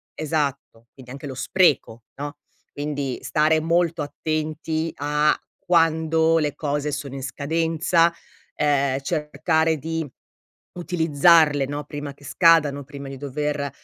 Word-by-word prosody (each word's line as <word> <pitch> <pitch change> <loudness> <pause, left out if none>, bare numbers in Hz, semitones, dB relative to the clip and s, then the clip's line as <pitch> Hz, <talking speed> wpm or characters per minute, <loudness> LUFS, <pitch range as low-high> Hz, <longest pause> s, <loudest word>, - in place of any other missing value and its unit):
esatto, 140 -6 -3
quindi 125 -2 -13
anche 140 +2 -8
lo 135 - -6
spreco, 130 -7 +1
no? 145 +1 -5 0.4
Quindi 145 -3 -3
stare 155 +1 +2
molto 170 0 +1
attenti 155 +2 -3
a 150 +1 +1 0.2
quando 165 -2 +2
le 150 -2 -1
cose 145 0 -2
sono 145 -2 -5
in 135 - -6
scadenza, 165 +4 +1 0.4
ehm, 140 -2 +1
cercare 160 +2 0
di 160 +1 -3 0.7
utilizzarle, 160 -3 +3
no, 145 +2 -4
prima 145 -1 -6
che 145 - -21
scadano, 150 -5 +4
prima 140 0 -9
di 135 - -7
dover, 145 +1 -3
150 Hz, 120 wpm, -23 LUFS, 140-160 Hz, 0.7 s, scadano